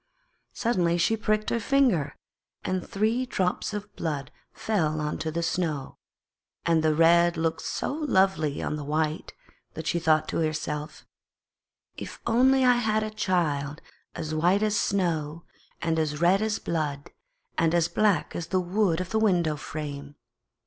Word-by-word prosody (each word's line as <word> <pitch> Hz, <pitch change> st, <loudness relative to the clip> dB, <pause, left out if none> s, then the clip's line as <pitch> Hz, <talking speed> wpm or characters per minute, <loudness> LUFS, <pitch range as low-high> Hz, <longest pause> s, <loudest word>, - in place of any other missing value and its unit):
Suddenly 180 Hz, -8 st, +1 dB
she 175 Hz, +6 st, +2 dB
pricked 215 Hz, -1 st, 0 dB
her 235 Hz, -, +1 dB
finger 220 Hz, -, +2 dB, 0.5 s
and 185 Hz, -1 st, -1 dB
three 220 Hz, +5 st, 0 dB
drops 185 Hz, -4 st, -1 dB
of 205 Hz, 0 st, -6 dB
blood 150 Hz, -4 st, -3 dB, 0.2 s
fell 160 Hz, -8 st, -1 dB
on 150 Hz, 0 st, -2 dB
to 160 Hz, -, -2 dB
the 170 Hz, +2 st, -2 dB
snow. 160 Hz, -5 st, -2 dB, 0.7 s
And 165 Hz, -1 st, +3 dB
the 155 Hz, -1 st, +3 dB
red 170 Hz, +1 st, +5 dB
looked 160 Hz, 0 st, -1 dB
so -, -, -3 dB
lovely 190 Hz, -, +1 dB
on 150 Hz, -, -2 dB
the 150 Hz, -, -5 dB
white 155 Hz, +2 st, -2 dB, 0.4 s
that 160 Hz, -1 st, -6 dB
she 170 Hz, -, 0 dB
thought 155 Hz, -1 st, +2 dB
to -, -, -2 dB
herself: 155 Hz, -1 st, -3 dB, 0.9 s
'If -, -, -8 dB
only 260 Hz, +3 st, +4 dB
I 250 Hz, -1 st, +5 dB
had 215 Hz, -2 st, +1 dB
a 215 Hz, -, -4 dB
child 155 Hz, -8 st, -1 dB, 0.4 s
as 155 Hz, 0 st, -4 dB
white 175 Hz, +6 st, +2 dB
as 215 Hz, -1 st, +1 dB
snow 170 Hz, -6 st, -1 dB, 0.4 s
and 160 Hz, -1 st, +1 dB
as 150 Hz, -2 st, -1 dB
red 180 Hz, +4 st, +4 dB
as 215 Hz, -1 st, 0 dB
blood, 150 Hz, -4 st, -3 dB, 0.4 s
and 165 Hz, 0 st, +2 dB
as 170 Hz, -1 st, +3 dB
black 210 Hz, -6 st, +1 dB
as 165 Hz, -, -4 dB
the 185 Hz, -, +1 dB
wood 180 Hz, -1 st, +1 dB
of 185 Hz, -, -6 dB
the 220 Hz, -, +2 dB
window 175 Hz, -8 st, +2 dB
frame!' 145 Hz, -1 st, -6 dB
170 Hz, 155 wpm, -26 LUFS, 155-210 Hz, 0.9 s, red